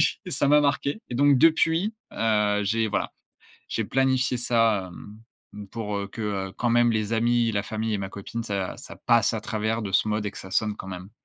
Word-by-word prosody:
oui, - - +6 0.2
ça 140 - +1
m'a 150 0 +6
marqué 140 +5 0
et - - -4
donc 140 +2 +5
depuis, 165 - +3 0.2
heu, 105 -2 +1
j'ai 110 +2 +1
voilà, - - -2 0.6
j'ai 115 - -1
planifié 130 +1 +1
ça, 115 -6 +1 0.6
hem, 105 -1 -8
pour, 105 -2 -4
heu, 100 - -4
que, 110 +2 -7
heu, 95 -2 -3
quand 120 -1 0
même 120 0 +4
les 110 0 -1
amis, 115 0 +2
la 100 -1 0
famille 110 +1 -3
et 100 - -1
ma 95 - -4
copine, 100 +4 -6
ça 100 -4 -3
ça - - -10
passe - - +3
à - - -2
travers 110 +1 -2
de 100 -2 -5
ce 110 - +3
mode 105 0 -1
et - - -2
que - - -10
ça 95 - -9
sonne 105 +2 +1
quand - - -8
même. 95 +1 -8
110 Hz, 220 wpm, -25 LUFS, 105-120 Hz, 0.6 s, oui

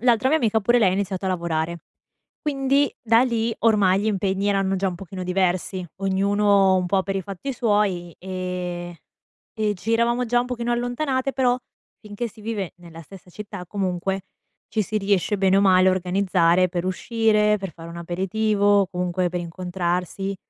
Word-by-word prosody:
l'altra 245 +1 +3
mia 315 - +3
amica 225 -4 +1
pure 240 +4 +3
lei 195 -5 +4
ha - - 0
iniziato 195 -1 -2
a - - +1
lavorare. 170 -2 -2 0.6
Quindi, 275 -1 +1
da 230 0 +4
lì- 230 -2 0
ormai 205 -4 +3
gli - - -1
impegni 195 -1 0
erano 195 -1 +1
già 195 +1 0
un 180 - -5
pochino 185 0 -8
diversi- 185 0 -1 0.2
ognuno 195 0 +3
un 185 - 0
po' 190 +1 +1
per 195 0 -2
i 190 - -2
fatti 200 +9 -5
suoi, 205 -8 0
e 180 -2 -5 0.6
e 210 -1 0
ci 210 +6 -3
eravamo 235 +2 +1
già 240 +1 +2
un 245 - -3
pochino 240 -1 -2
allontanate. 260 +3 -1
Però, 250 -1 +2 0.4
finché 210 +2 -5
si 220 +1 -17
vive 210 -5 -3
nella 170 -1 -12
stessa 180 +2 -14
città, 200 -1 -8
comunque, 190 0 -2 0.5
ci 220 - 0
si 215 +2 -2
riesce 200 0 +1
bene 195 0 +3
o - - +4
male 185 -1 +5
a 185 - +4
organizzare 185 -1 +2
per 175 0 -3
uscire, 210 +1 +2
per 195 -3 -6
fare 165 0 -11
un 170 - -9
aperitivo, 200 +3 +1
comunque 180 0 -1
per 180 - -2
incontrarsi, 180 +2 -3
195 Hz, 175 wpm, -23 LUFS, 180-220 Hz, 0.6 s, male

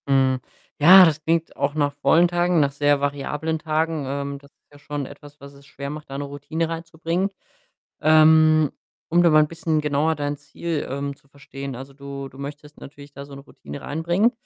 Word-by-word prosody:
Hm. 135 -1 +2 0.4
Ja, 185 +5 +9
das 155 -2 0
klingt 165 +1 0
auch 140 +1 -1
nach 145 -2 0
vollen 155 +5 +3
Tagen, 175 0 +1
nach 140 -2 +2
sehr 145 0 +2
variablen 150 +3 -2
Tagen. 155 -1 -1
Ähm, 140 +1 -4
das 140 0 -20
ist - - -58
ja 145 - -17
schon 145 -1 -5
etwas, 145 +2 -14
was 140 0 -12
es 140 0 -18
schwer 140 -1 -7
macht, 150 -1 -9
da 135 - -6
'ne 145 - -3
Routine 145 +4 -4
reinzubringen. 165 +3 -3 0.7
Ähm, 155 -1 +5 0.4
um 175 +1 +4
da 170 - +5
mal 155 -1 +6
'n - - -2
bisschen 165 -1 -1
genauer 150 +2 +1
dein 145 0 -3
Ziel, 155 +2 -5
ähm, 140 +1 -4
zu 140 - -30
verstehen, 140 -1 -8
also, 135 +2 -10
du 140 0 -8
du 135 - -17
möchtest 145 +1 -9
natürlich 140 0 -13
da 140 0 -9
so 140 -1 -12
'ne 140 - -10
Routine 140 0 -11
reinbringen. 170 - +1
145 Hz, 200 wpm, -23 LUFS, 140-160 Hz, 0.7 s, Ja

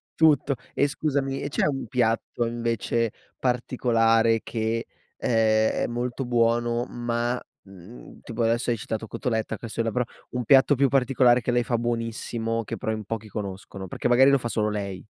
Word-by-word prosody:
Tutto 145 -3 +4 0.2
e 140 - +2
scusami, 140 -2 -1
e 145 - -3
c'è - - +1
un 135 -3 -2
piatto 120 -1 0
invece 115 -1 -1 0.3
particolare 115 -2 +2
che, 115 0 -2 0.3
ehm, 110 -2 +3
è - - 0
molto 120 +2 -3
buono, 120 0 +1
ma, 120 +1 -2 0.2
mhmm, 95 +4 -13
tipo 115 0 -3
adesso 115 +2 +1
hai 115 - +1
citato 110 +1 -4
cotoletta, 110 -2 -2
casseula, 115 +1 -3
però 125 +2 +1 0.3
un 125 -1 -2
piatto 135 +2 +6
più 135 0 +3
particolare 125 -2 +4
che 120 - -1
lei 120 0 +2
fa 120 0 0
buonissimo, 115 -1 -2
che 115 +1 -5
però 110 - -2
in 110 -1 -3
pochi 110 0 -5
conoscono? 95 -1 -6
Perché - - -2
magari 130 +3 +6
lo 140 - +5
fa 120 - -4
solo 105 -2 0
lei. 100 -3 -4
115 Hz, 165 wpm, -25 LUFS, 115-125 Hz, 0.3 s, piatto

